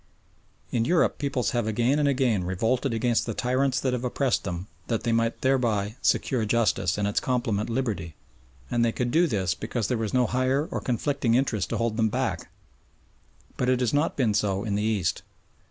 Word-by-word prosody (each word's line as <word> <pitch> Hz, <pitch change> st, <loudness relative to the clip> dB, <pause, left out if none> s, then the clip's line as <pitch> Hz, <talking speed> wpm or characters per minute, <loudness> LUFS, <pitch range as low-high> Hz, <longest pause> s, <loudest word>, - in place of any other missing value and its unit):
In 115 Hz, -, +1 dB
Europe 170 Hz, +7 st, +2 dB
peoples 140 Hz, -4 st, -1 dB
have 120 Hz, -3 st, -1 dB
again 120 Hz, +6 st, +1 dB
and 145 Hz, -, +2 dB
again 125 Hz, -8 st, +1 dB
revolted 115 Hz, +9 st, 0 dB
against 115 Hz, +1 st, +1 dB
the 115 Hz, -, -3 dB
tyrants 130 Hz, +1 st, +1 dB
that 130 Hz, -2 st, 0 dB
have 125 Hz, 0 st, -2 dB
oppressed 125 Hz, -1 st, 0 dB
them 90 Hz, -1 st, -4 dB, 0.2 s
that 115 Hz, -2 st, -1 dB
they 120 Hz, -, 0 dB
might 115 Hz, 0 st, 0 dB
thereby 115 Hz, -6 st, +1 dB
secure 125 Hz, -4 st, +1 dB
justice 105 Hz, -4 st, +1 dB
and 100 Hz, -1 st, 0 dB
its 105 Hz, -, +1 dB
complement 120 Hz, -5 st, -1 dB
liberty, 110 Hz, -, -2 dB, 0.6 s
and 120 Hz, -, +2 dB
they 115 Hz, -, +2 dB
could 120 Hz, +1 st, -2 dB
do 170 Hz, +5 st, +4 dB
this 95 Hz, -, 0 dB
because 115 Hz, 0 st, -3 dB
there 125 Hz, -, 0 dB
was 110 Hz, -2 st, -2 dB
no 125 Hz, -1 st, +3 dB
higher 130 Hz, +5 st, 0 dB
or -, -, -2 dB
conflicting 125 Hz, -1 st, 0 dB
interest 115 Hz, -7 st, 0 dB
to -, -, -1 dB
hold 115 Hz, -1 st, -1 dB
them 110 Hz, -1 st, +2 dB
back; -, -, -2 dB, 1.1 s
but 125 Hz, -, 0 dB
it 130 Hz, -1 st, +2 dB
has 125 Hz, -1 st, 0 dB
not 145 Hz, +3 st, +1 dB
been 120 Hz, -6 st, +2 dB
so 100 Hz, -1 st, 0 dB
in 105 Hz, -3 st, -2 dB
the 105 Hz, -, 0 dB
East. 105 Hz, -6 st, 0 dB
115 Hz, 195 wpm, -26 LUFS, 105-130 Hz, 1.1 s, do